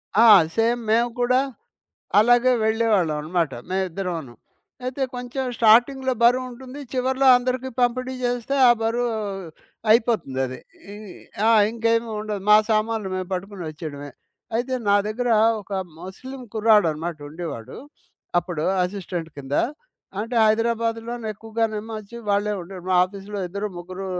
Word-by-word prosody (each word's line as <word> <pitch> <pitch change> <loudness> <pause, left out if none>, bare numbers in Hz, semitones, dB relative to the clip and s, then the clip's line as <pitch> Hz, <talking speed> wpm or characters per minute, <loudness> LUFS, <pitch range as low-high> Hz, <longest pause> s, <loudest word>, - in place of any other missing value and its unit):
ఆ! 225 +3 +6 0.3
సేమ్ 235 +1 +2
మేము 235 +2 +3
కూడా 250 +1 +3 0.8
అలాగే 245 +3 +5
వెళ్ళేవాళ్ళమనమాట 175 -8 +1 0.2
మేమిద్దరమును. 180 -8 -3 0.5
అయితే 255 +2 -3
కొంచెం 250 +2 -4
స్టార్టింగ్‌లో 250 +4 +4
బరువుంటుంది 255 +2 +1
చివర్లో 260 +1 +1
అందరికీ 255 +1 -2
పంపిణీ 255 +1 0
జేస్తే 245 +2 -1
ఆ - - +8
బరువు 235 +1 0 0.8
అయిపోతుందది. 135 - +1 0.3
ఈ - - -8 0.5
ఆ! - - +6 0.2
ఇంకేమి 230 0 0
ఉండదు. 210 -2 -4
మా 210 - +10
సామాన్లు 215 -2 0
మేము 185 -1 -4
పట్టుకొని 190 0 -5
ఒచ్చేయడమే. 145 -2 -8 0.5
అయితే, 255 +2 -1
నా 200 - +5
దగ్గర 245 +3 -2 0.3
ఒక 205 - -18 0.3
ముస్లిం 255 +9 -9
కుర్రాడనమాట 175 -8 +2
ఉండేవాడు. 155 -7 -7 0.6
అప్పుడు 175 -3 -3 0.2
అసిస్టెంట్ 180 -3 -5
కింద. 140 0 -5 0.7
అంటే 230 +2 -4
హైదరాబాదులో 230 +1 0
నేక్కువగానేమో 220 0 -3
ఒచ్చి 215 +3 -12
వాళ్ళే 205 +1 +1
ఉండే 185 +3 -10
వాళ్ళు 180 - -12
మా 185 - +4
ఆఫీస్‌లో 200 +2 -8
ఇద్దరు, 200 +3 -4
ముగ్గురు, 185 +2 -7
220 Hz, 120 wpm, -23 LUFS, 185-240 Hz, 0.8 s, మా